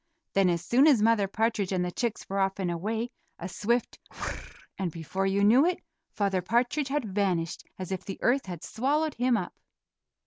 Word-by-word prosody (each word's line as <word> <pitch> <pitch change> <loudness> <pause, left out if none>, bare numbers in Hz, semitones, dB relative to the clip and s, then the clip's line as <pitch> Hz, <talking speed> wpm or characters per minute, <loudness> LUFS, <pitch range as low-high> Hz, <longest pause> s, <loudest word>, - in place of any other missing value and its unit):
Then 195 -2 +4
as 170 0 -1
soon 260 - +5
as 275 -7 +6
Mother 215 -2 +3
Partridge 215 -1 0
and 180 -1 +1
the 180 - -3
chicks 235 +3 -3
were 195 +1 -2
off 195 0 +1
and 185 -3 -1
away, 220 +7 -2 0.3
a 175 - -5
swift 235 +6 -1
"whir - - -5
r - - -3
r," - - -8 0.4
and 185 -3 -1
before 175 +4 -2
you 195 +1 +2
knew 235 +7 +6
it, 360 - +1 0.4
Father 195 -3 +1
Partridge 245 - +1
had 270 -9 -2
vanished 180 -4 0
as 185 0 -6
if 190 - -3
the 195 - -6
earth 260 -2 +2
had 175 -3 -6
swallowed 295 +5 0
him 245 0 +2
up. 185 - -4
200 Hz, 205 wpm, -28 LUFS, 185-240 Hz, 0.4 s, as